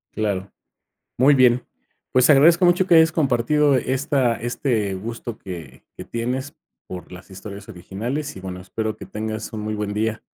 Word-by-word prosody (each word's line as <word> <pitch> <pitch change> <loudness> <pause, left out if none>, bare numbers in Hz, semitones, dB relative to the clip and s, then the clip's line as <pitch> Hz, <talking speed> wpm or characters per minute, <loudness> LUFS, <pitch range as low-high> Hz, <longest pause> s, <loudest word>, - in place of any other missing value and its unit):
Claro. 100 -3 -2 0.7
Muy 135 +4 +6
bien. 125 -2 +4 0.5
Pues, 130 +2 +4
agradezco 160 +5 +6
mucho 175 +1 +4
que 170 - +5
hayas 160 0 +6
compartido 145 0 +2
esta 130 -1 +1
este 115 -3 -1
gusto 115 +3 -6
que 90 -4 -9
que - - -8
tienes 130 +5 -4 0.3
por 90 0 -8
las 90 +2 -12
historias 100 +2 -9
originales, 115 - -5
y - - -8
bueno, 90 -1 -7
espero 110 +3 -4
que - - -10
tengas 110 0 -5
un 110 - -5
muy 110 0 -3
buen 105 -1 -3
día. 110 +1 -1
115 Hz, 160 wpm, -22 LUFS, 105-140 Hz, 0.7 s, Muy